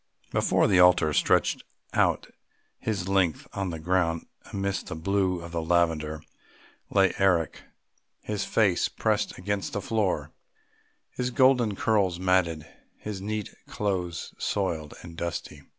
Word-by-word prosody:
Before - - +2
the 95 - +4
altar, 90 -4 +5
stretched - - +2 0.3
out - - +2
all - - -23 0.5
his 100 -4 -2
length 95 -5 +1
on 95 -1 -2
the 80 - -4
ground 85 0 0 0.3
amongst 100 0 -2
the - - -5
blue 95 +2 0
of 85 0 -9
the 85 -1 -2
lavender, 80 -2 +1 0.7
lay 95 -1 +3
Eric, 90 -5 +2 0.6
his 105 -2 -3
face 100 -6 +2
pressed - - -1
against 100 +1 -3
the - - -1
floor, 105 -2 -1 0.8
his 125 0 -2
golden 125 -4 +3
curls 95 -5 +1
matted, 90 -4 +1 0.3
his 105 -3 -6
neat 105 +1 -4
clothes 90 -4 -3
soiled 80 -7 -2
and 85 -1 -11
dusty. 85 -3 -4
95 Hz, 135 wpm, -27 LUFS, 85-100 Hz, 0.8 s, altar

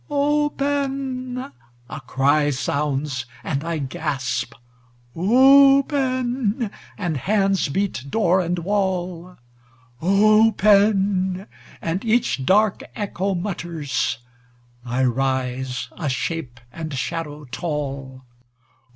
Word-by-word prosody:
"Open!" 280 -3 -1 0.5
a - - -7
cry 145 +3 +2
sounds, 140 -1 -2 0.2
and 140 +6 -2
I 165 0 -2
gasp. 135 -5 -3 0.6
"Open!" 260 - +4 0.3
and 175 -7 -2
hands 195 - +1
beat 190 -3 -2
door 185 0 +2
and 175 0 -1
wall. 180 -1 -2 0.6
"Open!" 200 -1 +3 0.4
and 170 +3 -2
each 220 - +1
dark 210 +1 +3
echo 200 -2 -2
mutters. 170 - -2 0.7
I 125 +1 -1
rise, 130 0 -1
a 155 -5 -4
shape 130 -2 -3
and 160 +1 -6
shadow 150 +2 -4
tall. 135 -2 -5
180 Hz, 85 wpm, -22 LUFS, 140-215 Hz, 0.7 s, Open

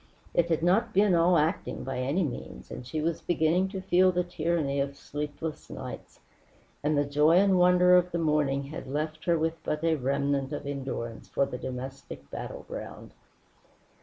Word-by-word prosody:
It 170 0 +2
had 165 -1 +1
not 185 +6 +2
been 200 -1 +5
all 170 +1 +4
acting, 155 +2 -1
by 130 0 -3
any 140 +9 +1
means, 140 -6 -6
and 125 - -7
she 155 +4 -2
was 165 +1 -1
beginning 175 +2 +2
to 190 -1 -5
feel 185 0 +4
the 180 0 0
tyranny 165 -5 -1
of 140 0 -1
sleepless 150 +2 -5
nights; - - -8 0.6
and 150 0 +2
the 145 - +2
joy 150 +3 +4
and 190 -1 +4
wonder 180 0 +6
of 180 0 +4
the 170 - -1
morning 150 -4 +1
had 140 0 -7
left 155 +3 -3
her 170 -1 +3
with 160 0 -2
but 150 +1 -2
a 165 -1 +3
remnant 140 0 0
of - - -5
endurance 130 -5 -5
for 140 - +1
the 125 -2 -6
domestic 130 - -7
battleground. - - -7
155 Hz, 175 wpm, -28 LUFS, 140-175 Hz, 0.6 s, wonder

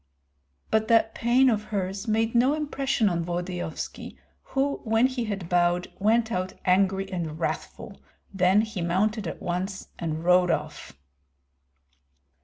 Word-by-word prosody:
But 220 0 +2
that 225 -1 +3
pain 245 +3 +3
of 215 -4 +1
hers 195 0 -3
made 225 +1 +1
no 255 +5 +3
impression 275 -6 0
on 170 -3 0
Volodyovski, 175 -1 -5 0.2
who, 275 +1 -1
when 225 +1 +3
he 255 -2 -1
had 200 -5 -4
bowed, 175 0 +1
went 225 +3 +2
out 185 -2 -2
angry 190 +1 +2
and 165 -4 -3
wrathful; 165 - -5 0.3
then 190 +2 +4
he 215 -4 -4
mounted 200 +4 0
at - - -7
once 185 +3 -3
and 160 -1 -3
rode 180 0 +4
off. 150 - -3
195 Hz, 135 wpm, -26 LUFS, 175-225 Hz, 0.3 s, then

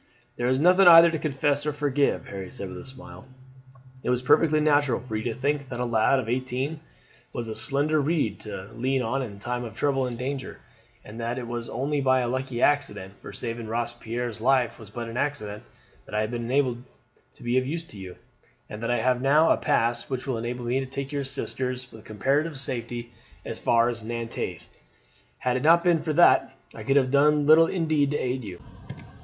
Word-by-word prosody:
"There 120 - -1
is 130 +1 +2
nothing 180 +5 +5
either 170 0 +9
to 160 - -2
confess 145 -1 0
or 150 - -1
forgive," 145 -1 0
Harry 95 -2 -6
said 100 - -7
with - - -8
a - - -10
smile. 130 0 -12 0.7
"It - - -3
was 125 0 +1
perfectly 155 +3 +4
natural 145 -4 +2
for 125 -4 -7
you 110 - -1
to 120 - -1
think 140 0 -1
that 120 - -5
a 125 - 0
lad 115 +3 +3
of 130 -4 -2
eighteen 130 +5 -2 0.5
was 120 -1 -4
a 110 - -4
slender 145 +5 +1
reed 140 - 0
to 105 -1 -8
lean 130 +2 0
on 130 +4 -1
in 115 -6 -5
the - - -14
time 120 +3 -3
of 115 -2 -8
trouble 135 -1 +1
and 120 -1 -5
danger, 135 +1 -5 0.5
and 110 +3 -10
that 120 +2 -2
it 125 - -4
was 120 0 -5
only 140 +4 -1
by 130 -1 +3
a 120 - -1
lucky 130 0 -2
accident 105 -10 +1
for - - -11
saving 115 -1 -5
Robespierre's 120 0 -3
life 130 -1 +2
was 110 -3 -12
but 115 +2 -6
an 115 +1 -6
accident 105 -8 -2 0.5
that - - -7
I 105 - +2
have 110 +1 -2
been 120 -1 -3
enabled 125 -1 0 0.5
to - - -14
be 120 +2 +2
of 130 - -4
use 165 +3 -3
to 105 - -12
you; 95 -2 -8 0.5
and 105 - -8
that 115 - -2
I 120 -2 +1
have 125 0 +1
now 150 +4 +4
a - - +5
pass 120 +1 0
which 130 -2 -3
will 130 -4 -2
enable 120 +1 -4
me 125 +3 +1
to 135 - -4
take 135 +1 -5
your 140 -1 -2
sisters 130 -1 -3
with 110 -1 -13
comparative 135 +8 0
safety 120 -2 -4 0.3
as - - -5
far 115 0 +3
as 120 -2 -3
Nantes. 115 0 -5 0.7
Had 125 0 0
it - - -3
not 165 +3 +5
been 175 -3 +3
for 155 - -2
that - - +5 0.2
I - - -9
could 135 +1 +2
have 130 -2 +2
done 145 +1 +4
little 160 +2 +7
indeed 155 -6 +1
to 145 - 0
aid 130 0 -2
you." 95 -4 -7
130 Hz, 215 wpm, -26 LUFS, 115-145 Hz, 0.7 s, either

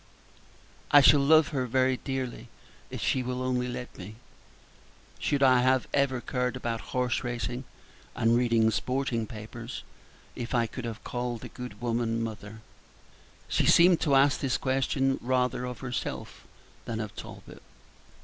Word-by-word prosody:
"I 145 - +8
shall 145 +1 +7
love 155 +2 +5
her 130 -5 -2
very 130 +1 +2
dearly 130 -4 -4 0.4
if - - -6
she 130 - +1
will 125 0 -3
only 125 -1 0
let 125 -2 -7
me. 100 +4 -8 1.0
Should 140 -1 +1
I 130 -2 +6
have 130 +1 +2
ever 140 -2 +2
cared 125 0 -2
about 115 -2 -3 0.2
horse 125 0 0
racing, 120 +1 -3 0.5
and 115 +1 +3
read 115 -2 +3
sporting 120 0 -1
papers, 115 +2 -8 0.5
if 120 0 -4
I 120 -1 +3
could 120 +2 -7
have 115 -1 -6
called 120 -2 -4
a - - -8
good 125 -4 -9
woman 115 -1 0
'mother?'" 110 -1 -6 0.9
She - - +1
seemed 175 0 +6
to 140 -3 +3
ask 140 +1 +4
this 130 -3 0
question 135 0 0
rather 125 0 0
of 125 -2 -6
herself 125 -3 -5 0.4
than 115 -1 -4
of 110 -2 -5
Talbot. - - -10
125 Hz, 150 wpm, -28 LUFS, 115-130 Hz, 1.0 s, I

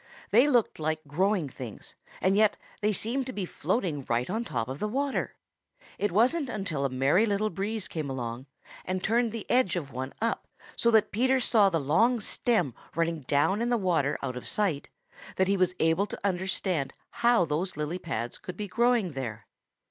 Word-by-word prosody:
They 240 +7 +6
looked 245 - +2
like 155 0 -1
growing 185 +2 +1
things, 125 -4 -9 0.3
and 190 +1 +3
yet 210 0 +4 0.2
they 210 +1 +2
seemed 240 +6 0
to 255 - -5
be 200 -4 -3
floating 170 - -1
right 120 +6 0
on 225 +3 -1
top 115 - -3
of 130 +2 -5
the 210 - -1
water. 275 +5 -1 0.6
It 205 - +1
wasn't 255 - +2
until 195 -10 -2
a - - +1
Merry 135 - +3
Little 210 +1 0
Breeze 200 +3 -3
came 155 -4 -4
along 125 0 -5 0.4
and 185 0 -3
turned 230 +1 +2
the 225 -2 -6
edge 245 -7 +3
of 145 -6 -4
one 130 +2 -4
up 230 +1 -1 0.3
so 235 - +3
that 220 -2 +4
Peter 260 +4 +2
saw 215 -4 +4
the 165 -3 0
long 225 - +3
stem 205 - 0 0.2
running 165 0 0
down 170 +9 +2
in 240 - 0
the 240 - +3
water 165 -8 +1
out 125 - -3
of 125 - -7
sight, 185 -9 0 0.5
that 190 - +2
he 200 - +3
was 185 -1 +1
able 165 +5 +2
to - - -6
understand 185 -6 -1 0.3
how 235 -7 +5
those 160 +3 -2
lily 155 +4 -2
pads 120 -9 -4
could 180 -4 -8
be 210 - -4
growing 235 -2 +2
there. 115 -6 -5
185 Hz, 190 wpm, -28 LUFS, 150-220 Hz, 0.6 s, They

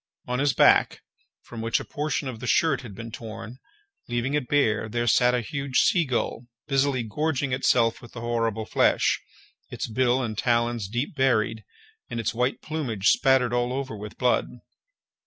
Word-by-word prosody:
On 125 0 -2
his 145 0 +2
back, - - +4 0.4
from 115 -2 -8
which 115 0 +1
a - - -7
portion 150 -1 -2
of 120 -4 -6
the 125 - -6
shirt 150 -3 +2
had 115 -6 -10
been 115 +2 -8
torn, 115 +2 -8 0.5
leaving 120 +3 -1
it 145 -4 -1
bare, 110 -7 +1
there 120 +2 -1
sat 125 +2 +4
a 125 - 0
huge 135 +3 -3
sea 175 -3 +4
gull, 125 -2 -2 0.2
busily 135 -2 +1
gorging 140 +4 -1
itself 115 -3 +2
with 120 - -14
the 115 - -7
horrible 115 -2 -1
flesh, - - +2 0.5
its - - -4
bill 125 +2 +1
and 110 -3 -4
talons 120 -3 +1
deep 120 - -3
buried, 110 -5 +1 0.5
and 115 - -4
its 115 - -1
white 125 +3 -1
plumage 125 -11 0
spattered 130 -3 +3
all 120 0 0
over 130 -3 -4
with 105 0 -9
blood. 125 -1 +2
120 Hz, 175 wpm, -25 LUFS, 115-135 Hz, 0.5 s, back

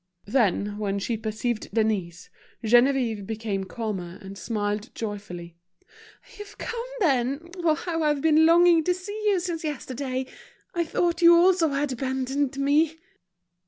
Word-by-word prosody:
Then, 205 -3 +1
when 200 -1 -1
she 225 +4 -2
perceived 220 +1 -3
Denise, 200 -5 -1 0.3
Geneviève 240 -3 +3
became 215 -3 -3
calmer, 190 -4 -5
and 195 -1 -10
smiled 210 +1 -3
joyfully. 180 -6 -6 0.8
"You've 415 0 -10
come, 470 0 -4 0.2
then! 280 +1 +1
How 330 +1 0
I've 300 -2 +2
been 320 +1 +5
longing 340 -1 +6
to 360 - +2
see 410 +4 -6
you 400 -3 +3
since 345 -2 -4
yesterday. 265 -3 -3 0.5
I 340 -2 0
thought 340 +1 0
you 340 0 +8
also 350 -1 +4
had 280 0 -1
abandoned 265 +2 -2
me!" 295 +3 +2
265 Hz, 130 wpm, -25 LUFS, 215-325 Hz, 0.8 s, you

